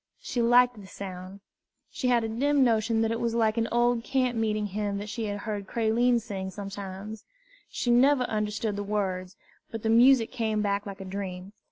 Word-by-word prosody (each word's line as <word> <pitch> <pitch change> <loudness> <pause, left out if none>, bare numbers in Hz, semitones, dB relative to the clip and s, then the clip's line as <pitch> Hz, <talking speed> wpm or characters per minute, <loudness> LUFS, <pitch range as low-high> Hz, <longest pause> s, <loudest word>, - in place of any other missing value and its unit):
She 260 - -3
liked 245 -1 +4
the 190 - -12
sound. 190 0 -8 0.5
She 255 - -2
had 240 -2 +3
a - - -1
dim 275 +5 +2
notion 225 -1 +2
that 225 - 0
it 230 - -2
was 230 -1 -1
like 220 -2 +2
an 230 - 0
old 240 0 +2
camp 255 -1 0
meeting 215 -2 0
hymn 205 0 -2
that 205 +1 -6
she 225 +1 -3
had 205 -1 -4
heard 205 -3 -4
Creline 235 +2 +2
sing 200 -4 -5
sometimes. 195 +2 -7 0.5
She 240 - -1
never 260 +2 +4
understood 210 -1 -2
the 205 - -2
words, 190 -3 -2 0.3
but 225 -1 -7
the 220 - 0
music 240 0 +5
came 220 -4 -1
back 200 0 -1
like 195 0 -7
a - - -7
dream. 190 0 -6
220 Hz, 195 wpm, -27 LUFS, 200-235 Hz, 0.5 s, music